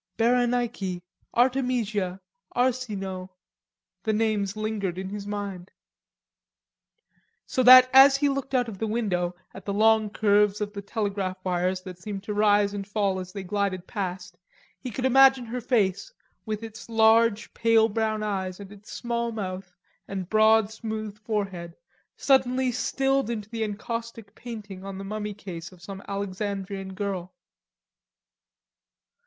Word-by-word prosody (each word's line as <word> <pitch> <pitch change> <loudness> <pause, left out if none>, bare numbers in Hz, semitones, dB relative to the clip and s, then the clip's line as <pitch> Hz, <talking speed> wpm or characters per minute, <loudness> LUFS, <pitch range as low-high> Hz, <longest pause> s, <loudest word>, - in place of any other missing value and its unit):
"Berenike, 235 -6 +1 0.3
Artemisia, 240 -7 +1 0.4
Arsinoe," 210 -7 -1 0.7
the 220 +3 0
names 210 -2 0
lingered 210 -4 -2
in 190 0 -4
his 205 0 -6
mind. 200 -3 -5 1.8
So 255 - 0
that 255 0 +10
as 270 +1 +8
he 290 +1 +2
looked 275 -1 -2
out 245 -1 +2
of 205 -4 -8
the 225 - -1
window 185 -6 -1 0.2
at 190 - -10
the 200 - -3
long 220 0 +4
curves 205 0 +3
of 205 -1 -3
the 200 - -5
telegraph 200 -2 -2
wires 185 +1 0
that 185 -1 -9
seemed 195 0 -6
to 210 - -4
rise 205 -1 +3
and 200 -1 -5
fall 200 -2 0
as 185 0 -7
they 195 0 -6
glided 190 -1 -2
past, 185 -4 -5 0.4
he 255 - -6
could 250 +3 -3
imagine 265 -1 +6
her 245 +2 -4
face, 220 - 0 0.4
with 215 0 -3
its 225 +1 -9
large, 225 -1 +3
pale 225 -1 +4
brown 220 0 -1
eyes 190 -3 -3
and 200 -1 -10
its 205 0 -13
small 235 -1 -2
mouth 190 -4 -5 0.4
and 190 -2 -5
broad 220 0 +5
smooth 220 -2 -5
forehead, 195 -6 -3 0.4
suddenly 260 -1 +2
stilled 270 +1 0
into 215 -2 -4
the 225 -1 -2
encaustic 230 0 -5
painting 210 -6 -8
on 195 -1 -6
the 195 - -6
mummy 210 +1 -4
case 180 -4 -8
of 185 - -16
some 195 +1 -8
Alexandrian 195 -1 -4
girl. 190 -2 -4
210 Hz, 140 wpm, -26 LUFS, 195-230 Hz, 1.8 s, that